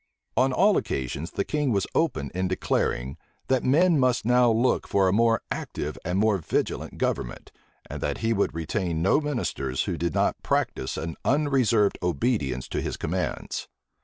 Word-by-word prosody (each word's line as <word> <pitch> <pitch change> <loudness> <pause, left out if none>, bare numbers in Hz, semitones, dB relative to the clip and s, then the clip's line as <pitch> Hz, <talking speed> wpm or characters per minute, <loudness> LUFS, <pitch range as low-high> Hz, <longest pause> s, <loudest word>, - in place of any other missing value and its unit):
On 130 +1 +3
all 195 +9 +4
occasions, 70 +5 -3
the - - -2
king 150 -4 0
was 100 -4 +1
open 75 - 0
in 95 +1 -1
declaring, 70 -7 -1 0.3
that 130 -2 +2
men 160 +4 +4
must 130 -3 +2
now 125 0 +5
look 115 +3 +2
for 95 -1 +3
a 95 - +2
more 115 0 +3
active 75 +1 -4
and 90 +2 -1
more 105 -1 +3
vigilant 80 - -2
government, - - -3 0.4
and - - -7
that - - -1
he 115 0 0
would 100 -5 0
retain 85 0 -2
no 100 - +4
ministers 90 - -2
who 90 -4 -3
did 85 0 -1
not - - +1
practise 65 - -1
an 80 0 -4
unreserved 130 -8 +2
obedience 75 - -1
to - - -2
his - - -3
commands. - - -3
100 Hz, 165 wpm, -26 LUFS, 80-130 Hz, 0.4 s, now